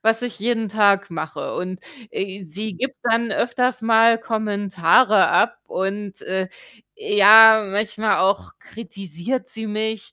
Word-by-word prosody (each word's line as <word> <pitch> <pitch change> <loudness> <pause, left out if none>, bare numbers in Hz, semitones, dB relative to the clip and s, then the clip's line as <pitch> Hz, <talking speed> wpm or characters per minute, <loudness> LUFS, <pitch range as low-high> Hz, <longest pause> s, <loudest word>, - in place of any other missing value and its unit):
was 225 +1 0
ich 245 -1 -6
jeden 225 0 -2
Tag 200 -2 +2
mache 160 -1 -6
und, 185 0 -6 0.3
äh, 195 0 -6
sie 200 +5 -7
gibt 260 +6 -5
dann 235 0 0
öfters 250 0 -1
mal 225 0 +4
Kommentare 205 -1 +1
ab 235 - +1
und, 195 +1 -5
äh, 190 0 -3 0.5
ja, 220 - +7
manchmal 210 +1 -1
auch 195 +1 -1
kritisiert 220 - -7
sie 225 -3 -8
mich. 220 0 -4
215 Hz, 130 wpm, -20 LUFS, 195-230 Hz, 0.5 s, ja